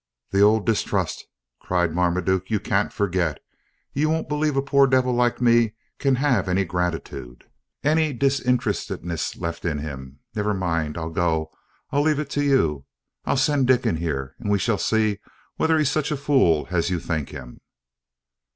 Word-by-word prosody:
"The 100 - +2
old 105 +1 +4
distrust!" 115 -2 -1 0.3
cried 90 -3 0
Marmaduke; 90 +2 0
"you 110 -2 +1
can't 100 0 0
forget. 90 -7 -1 0.5
You 150 +3 +1
won't 160 +1 -1
believe 150 -1 0
a - - +4
poor 140 0 +4
devil 130 -1 +2
like 120 0 +1
me 120 -2 +3 0.2
can 135 -2 +2
have 125 -8 +1
any 95 +2 +1
gratitude, 85 -8 -4 0.4
any 155 +1 +2
disinterestedness 125 - -1
left 85 -1 -5
in 80 -3 -1
him. 70 -3 -7 0.2
Never 105 -1 -1
mind, 85 -5 -1
I'll 80 0 -4
go. 80 -2 0 0.4
I'll 145 0 +2
leave 155 0 +2
it 145 -2 -4
to 145 - 0
you. 80 - +2 0.4
I'll - - +1
send 135 0 +2
Dick 125 -1 +3
in 105 -8 +1
here, 70 -5 -3
and 105 - -4
we 100 - +3
shall 105 0 0
see 110 +1 +1 0.4
whether 160 0 +2
he's 150 -3 +2
such 150 -2 0
a 150 - 0
fool 130 - +2
as 85 -1 +1
you 90 -2 -1
think 80 -4 -3
him." - - -10
105 Hz, 170 wpm, -23 LUFS, 85-135 Hz, 0.5 s, old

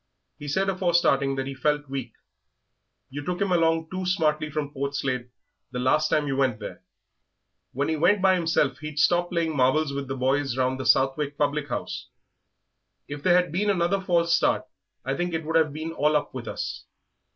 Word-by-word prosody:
He 145 - -7
said 190 +7 0
afore 185 -3 0
starting 135 -5 +3
that 135 0 -2
he 135 - -5
felt 145 +2 0
weak; 135 0 -5 1.0
you 145 +2 -5
took 180 +3 -3
him 200 -2 0
along 165 -2 +2
too 185 0 -3
smartly 155 -4 +1
from 145 -1 -4
Portslade 135 -3 -2 0.4
the 125 - -6
last 140 +5 +2
time 150 - +2
you 135 -1 -1
went 130 -5 +1
there." 105 - -8 0.9
"When 140 +3 -1
he 160 - 0
went 205 +7 +4
by 190 0 +4
himself 165 -5 +1
he'd 155 -1 -7
stop 175 +3 +3
playing 165 -3 -1
marbles 140 +3 +2
with 140 -1 -4
the 135 +1 -4
boys 135 0 0
round 130 0 0
the 130 - -3
Southwick 140 +2 +2
public 145 0 0
house." - - -4 1.0
"If 145 0 -6
there 175 +3 +4
had 180 -2 -2
been 200 +5 0
another 190 0 +1
false 170 -2 +2
start - - +1 0.4
I 135 +1 -1
think 175 +2 -2
it 160 -1 -3
would 160 +1 -2
have 160 -2 +4
been 155 +2 -5
all 150 -1 +1
up 150 - 0
with 125 -3 -6
us. 75 0 -5
150 Hz, 195 wpm, -25 LUFS, 135-170 Hz, 1.0 s, went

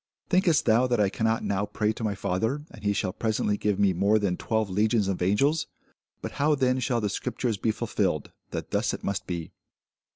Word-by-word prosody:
Thinkest 180 -4 +3
thou 120 +3 +4
that 120 -2 +1
I 100 -2 +3
cannot 110 0 0
now 100 0 0
pray 105 +1 0
to 110 - -7
my 105 -2 0
Father, 110 +9 -1
and 105 - -13
he 100 - +2
shall 95 -2 -1
presently 110 -1 0
give 105 -1 0
me 100 -2 +3
more 100 +5 +3
than 100 -4 0
twelve 110 +3 -1
legions 105 +2 +1
of 95 -2 -2
angels? 135 - +2 0.6
But - - -4
how 150 +1 +4
then 130 -2 +1
shall 125 -2 0
the 105 - 0
scriptures 115 +2 -2
be 110 - -1
fulfilled, 105 -9 -1 0.2
that - - -5
thus - - +1
it - - -11
must 100 -1 -2
be? 85 -3 -4
105 Hz, 205 wpm, -27 LUFS, 100-120 Hz, 0.6 s, thou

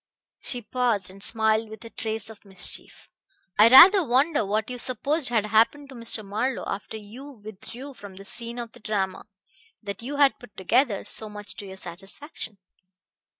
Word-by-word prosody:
She 245 -2 -3
paused 225 -6 -1
and 195 +1 -15
smiled 220 0 +3
with 220 +2 -11
a 230 - -10
trace 220 0 -4
of 215 - -16
mischief. 190 -3 -2 0.5
"I 215 - +9
rather 355 - +9
wonder 280 +1 +2
what 210 +2 -1
you 250 - -5
supposed 270 +4 0
had 225 -3 +1
happened 230 +7 +2
to 265 - -11
Mr. 230 -2 +1
Marlowe, 225 +6 -2
after 205 +2 -5
you 220 +6 -11
withdrew 230 +5 -10
from 205 -6 -12
the 195 +1 -12
scene 235 +3 -3
of 235 -2 -6
the - - -16
drama 195 -3 -3 0.6
that 200 0 -6
you 270 +5 -5
had 280 -1 +3
put 245 -4 -16
together 225 +2 +1
so 220 - +3
much 205 -2 -6
to 200 - -8
your 190 0 -10
satisfaction." 195 - -6
220 Hz, 175 wpm, -25 LUFS, 205-250 Hz, 0.6 s, I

